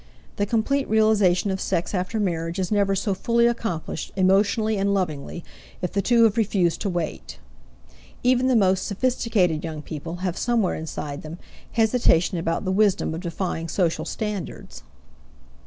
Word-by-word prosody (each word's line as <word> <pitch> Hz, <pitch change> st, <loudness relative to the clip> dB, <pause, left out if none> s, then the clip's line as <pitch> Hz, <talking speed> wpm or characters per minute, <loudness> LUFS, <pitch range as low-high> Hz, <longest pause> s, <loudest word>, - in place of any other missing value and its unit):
The 205 Hz, -, 0 dB
complete 265 Hz, +6 st, 0 dB
realization 210 Hz, -4 st, +3 dB
of 190 Hz, -, -3 dB
sex 170 Hz, -, -1 dB
after 185 Hz, +4 st, -1 dB
marriage 170 Hz, -4 st, -2 dB
is 185 Hz, 0 st, -2 dB
never 200 Hz, -2 st, +2 dB
so 200 Hz, +1 st, 0 dB
fully 235 Hz, +5 st, +2 dB
accomplished, 225 Hz, -10 st, -2 dB
emotionally 200 Hz, +3 st, +2 dB
and 200 Hz, +1 st, +1 dB
lovingly, 170 Hz, -2 st, -3 dB, 0.4 s
if 180 Hz, -, -1 dB
the 200 Hz, -, 0 dB
two 235 Hz, +3 st, +4 dB
have 225 Hz, 0 st, +3 dB
refused 190 Hz, -6 st, +1 dB
to 205 Hz, -, -1 dB
wait. 165 Hz, -, -4 dB, 0.9 s
Even 255 Hz, +1 st, +3 dB
the 260 Hz, -, +3 dB
most 190 Hz, -3 st, +2 dB
sophisticated 205 Hz, -7 st, 0 dB
young 155 Hz, -2 st, -5 dB
people 160 Hz, +3 st, -6 dB
have 180 Hz, -2 st, -1 dB
somewhere 235 Hz, -6 st, +1 dB
inside 150 Hz, -2 st, -5 dB
them 155 Hz, +2 st, -8 dB, 0.4 s
hesitations 220 Hz, -7 st, +3 dB
about 165 Hz, +4 st, -2 dB
the 185 Hz, -, 0 dB
wisdom 200 Hz, -4 st, +2 dB
of 165 Hz, -, -5 dB
defying 170 Hz, -1 st, -3 dB
social 165 Hz, -1 st, 0 dB
standards. 210 Hz, -3 st, -5 dB
190 Hz, 155 wpm, -24 LUFS, 170-220 Hz, 0.9 s, two